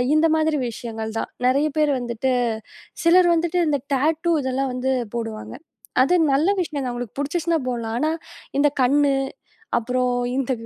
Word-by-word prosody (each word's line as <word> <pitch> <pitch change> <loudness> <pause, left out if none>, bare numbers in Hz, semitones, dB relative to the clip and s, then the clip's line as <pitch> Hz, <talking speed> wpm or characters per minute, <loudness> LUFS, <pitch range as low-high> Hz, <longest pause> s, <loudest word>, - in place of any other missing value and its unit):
இந்த 315 +1 +4
மாதிரி 315 -1 +1
விஷயங்கள் 225 -1 -6
தான். - - -4 0.2
நெறைய 280 +4 +3
பேர் 300 -1 +3
வந்துட்டு 245 +2 -1 0.7
சிலர் 350 +1 +6
வந்துட்டு 340 +2 0
இந்த 285 -2 +1 0.2
டேட்டூ 320 +5 +1
இதெல்லாம் 260 0 -1
வந்து 255 +1 -1 0.2
போடுவாங்க. 225 -2 -5 0.5
அது 360 - +3 0.2
நல்ல 300 +7 +3
விஷயம் 305 -5 -3
தான். 250 - -2
அவங்களுக்கு 240 0 -6
புடிச்சுச்சினா 325 +3 0
போடலாம். 230 -2 -3
ஆனா, 310 +4 +1 0.5
இந்த 295 - +5
கண்ணு 280 +2 +4 0.6
அப்புறம் 250 +1 0 0.2
இந்த 270 -1 -1
270 Hz, 145 wpm, -22 LUFS, 245-310 Hz, 0.7 s, சிலர்